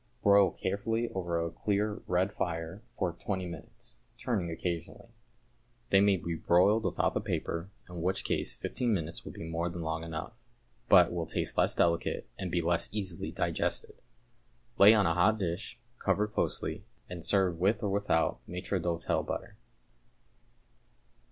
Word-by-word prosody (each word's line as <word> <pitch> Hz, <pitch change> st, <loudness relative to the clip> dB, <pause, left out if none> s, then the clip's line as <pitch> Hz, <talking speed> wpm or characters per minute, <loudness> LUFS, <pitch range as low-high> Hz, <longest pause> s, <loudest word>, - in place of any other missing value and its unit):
Broil 100 Hz, -2 st, +6 dB
carefully 115 Hz, +6 st, -2 dB
over 85 Hz, -3 st, -2 dB
a 85 Hz, 0 st, -2 dB
clear 105 Hz, +4 st, -1 dB
red 95 Hz, +3 st, +1 dB
fire 85 Hz, +2 st, -3 dB, 0.2 s
for 90 Hz, -, 0 dB
twenty 95 Hz, +1 st, -3 dB
minutes, 85 Hz, -2 st, -9 dB, 0.2 s
turning 100 Hz, -9 st, -1 dB
occasionally. 85 Hz, +6 st, -4 dB, 0.8 s
They 95 Hz, -, +7 dB
may 100 Hz, -1 st, +4 dB
be 85 Hz, 0 st, -4 dB
broiled 95 Hz, +7 st, +3 dB
without -, -, +1 dB
the -, -, -1 dB
paper, 85 Hz, +3 st, -3 dB, 0.2 s
in 90 Hz, -1 st, -7 dB
which 95 Hz, +3 st, 0 dB
case -, -, 0 dB
fifteen 120 Hz, -4 st, -1 dB
minutes 85 Hz, -2 st, -4 dB
will -, -, -7 dB
be -, -, -8 dB
more 80 Hz, +1 st, -2 dB
than 85 Hz, 0 st, -5 dB
long 80 Hz, 0 st, -2 dB
enough, 85 Hz, +6 st, -5 dB, 0.6 s
but 90 Hz, -4 st, +7 dB
will 85 Hz, -2 st, -2 dB
taste -, -, -1 dB
less -, -, +3 dB
delicate 85 Hz, 0 st, +1 dB
and 95 Hz, -, -3 dB
be 85 Hz, 0 st, +1 dB
less 85 Hz, 0 st, +2 dB
easily 95 Hz, -4 st, -3 dB
digested. -, -, -1 dB, 0.9 s
Lay 105 Hz, +3 st, +9 dB
on 105 Hz, -2 st, +3 dB
a 85 Hz, -, +3 dB
hot 105 Hz, +6 st, +3 dB
dish, 95 Hz, +5 st, -4 dB, 0.2 s
cover 100 Hz, +2 st, +1 dB
closely, 105 Hz, -, -2 dB, 0.2 s
and 85 Hz, -2 st, -7 dB
serve 95 Hz, -4 st, +2 dB
with 100 Hz, +5 st, +2 dB
or 105 Hz, -, +1 dB
without 100 Hz, -5 st, +1 dB
maître 90 Hz, +1 st, -2 dB
d'hôtel 85 Hz, 0 st, 0 dB
butter. -, -, -5 dB
90 Hz, 155 wpm, -31 LUFS, 85-100 Hz, 0.9 s, Lay